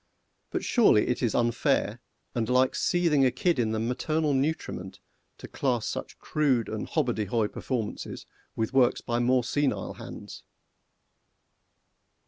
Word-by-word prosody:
But -, -, -3 dB
surely 215 Hz, -, +4 dB
it 125 Hz, -, -1 dB
is 120 Hz, -4 st, 0 dB
unfair, 120 Hz, -1 st, +1 dB, 0.3 s
and 115 Hz, -1 st, -1 dB
like 130 Hz, +1 st, +3 dB
seething 170 Hz, -6 st, +2 dB
a 130 Hz, -, +5 dB
kid 170 Hz, +3 st, 0 dB
in 115 Hz, -2 st, +1 dB
the 110 Hz, 0 st, -1 dB
maternal 145 Hz, +6 st, 0 dB
nutriment, 135 Hz, -, -2 dB, 0.4 s
to -, -, -9 dB
class 125 Hz, -5 st, -1 dB
such -, -, -5 dB
crude 135 Hz, -7 st, +1 dB
and 110 Hz, -1 st, -4 dB
hobbardyhoy 115 Hz, -, 0 dB
performances 120 Hz, -5 st, -4 dB, 0.3 s
with 110 Hz, +3 st, -2 dB
works 130 Hz, -2 st, +3 dB
by 120 Hz, 0 st, -1 dB
more 125 Hz, +1 st, +3 dB
senile 135 Hz, +4 st, -1 dB
hands! -, -, -10 dB
125 Hz, 130 wpm, -27 LUFS, 115-145 Hz, 0.4 s, a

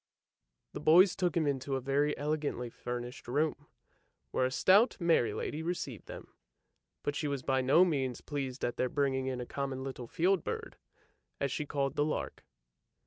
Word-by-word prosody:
The -, -, -5 dB
boys 180 Hz, +4 st, +6 dB
took 180 Hz, -3 st, 0 dB
him 160 Hz, -, +2 dB
into 135 Hz, -1 st, -1 dB
a -, -, 0 dB
very 140 Hz, +3 st, +1 dB
elegantly 145 Hz, -5 st, -2 dB
furnished 120 Hz, +3 st, -6 dB
room, 145 Hz, +2 st, -1 dB, 0.6 s
where 130 Hz, -, +2 dB
a -, -, -5 dB
stout, 200 Hz, -, +4 dB
merry 165 Hz, -, +3 dB
lady 150 Hz, +8 st, -3 dB
received 160 Hz, -, -4 dB
them, -, -, -10 dB, 0.7 s
but 145 Hz, -, -1 dB
she 150 Hz, -, -1 dB
was 140 Hz, -2 st, -2 dB
by 130 Hz, -1 st, +1 dB
no 140 Hz, +8 st, +5 dB
means 135 Hz, -7 st, -1 dB
pleased 135 Hz, -3 st, -4 dB
at 120 Hz, -, -3 dB
their 125 Hz, -, +1 dB
bringing 135 Hz, -2 st, 0 dB
in 130 Hz, -1 st, -2 dB
a 125 Hz, -, -4 dB
common 135 Hz, 0 st, -4 dB
little 130 Hz, -3 st, -6 dB
field 180 Hz, +6 st, +1 dB
bird, -, -, -5 dB, 0.6 s
as 140 Hz, -, 0 dB
she 150 Hz, +1 st, -3 dB
called 140 Hz, -1 st, -1 dB
the 145 Hz, -, +4 dB
lark. 155 Hz, -, -3 dB
140 Hz, 175 wpm, -32 LUFS, 130-155 Hz, 0.7 s, boys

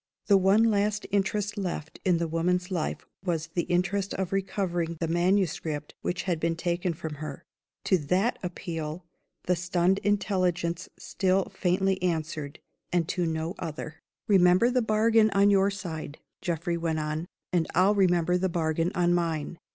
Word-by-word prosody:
The 200 Hz, -, +5 dB
one 195 Hz, +4 st, +4 dB
last 210 Hz, -1 st, +1 dB
interest 205 Hz, +1 st, 0 dB
left 170 Hz, -4 st, -4 dB
in 180 Hz, -2 st, +3 dB
the 170 Hz, 0 st, -1 dB
woman's 180 Hz, +3 st, 0 dB
life 170 Hz, -4 st, -2 dB, 0.2 s
was 165 Hz, -4 st, -2 dB
the 175 Hz, -, 0 dB
interest 195 Hz, +2 st, 0 dB
of 190 Hz, -1 st, -2 dB
recovering 180 Hz, -4 st, -1 dB
the 165 Hz, -, -1 dB
manuscript 170 Hz, -4 st, 0 dB
which 175 Hz, 0 st, -2 dB
had 175 Hz, -4 st, -1 dB
been 165 Hz, +1 st, 0 dB
taken 175 Hz, 0 st, -1 dB
from 160 Hz, -1 st, -5 dB
her. 150 Hz, -3 st, -6 dB, 0.4 s
To 185 Hz, -, +3 dB
that 185 Hz, +10 st, 0 dB
appeal 170 Hz, -2 st, -5 dB, 0.4 s
the 180 Hz, -, +1 dB
stunned 180 Hz, +2 st, +1 dB
intelligence 185 Hz, -4 st, 0 dB
still 190 Hz, 0 st, 0 dB
faintly 190 Hz, +1 st, +1 dB
answered 160 Hz, -4 st, -2 dB, 0.3 s
and 175 Hz, -2 st, +1 dB
to 175 Hz, -2 st, 0 dB
no 160 Hz, +1 st, -2 dB
other. 160 Hz, -1 st, -6 dB, 0.3 s
"Remember 185 Hz, +3 st, +5 dB
the 250 Hz, 0 st, +2 dB
bargain 220 Hz, 0 st, +4 dB
on 200 Hz, +1 st, +5 dB
your 195 Hz, 0 st, +4 dB
side," 160 Hz, -7 st, -6 dB, 0.2 s
Geoffrey 170 Hz, 0 st, -1 dB
went 165 Hz, -1 st, -1 dB
on, 155 Hz, +2 st, -3 dB, 0.3 s
"and 170 Hz, -2 st, +2 dB
I'll 185 Hz, +4 st, +5 dB
remember 180 Hz, -3 st, +3 dB
the 190 Hz, +1 st, +1 dB
bargain 165 Hz, 0 st, 0 dB
on 175 Hz, -1 st, +3 dB
mine. 165 Hz, -2 st, -1 dB
180 Hz, 155 wpm, -27 LUFS, 165-195 Hz, 0.4 s, The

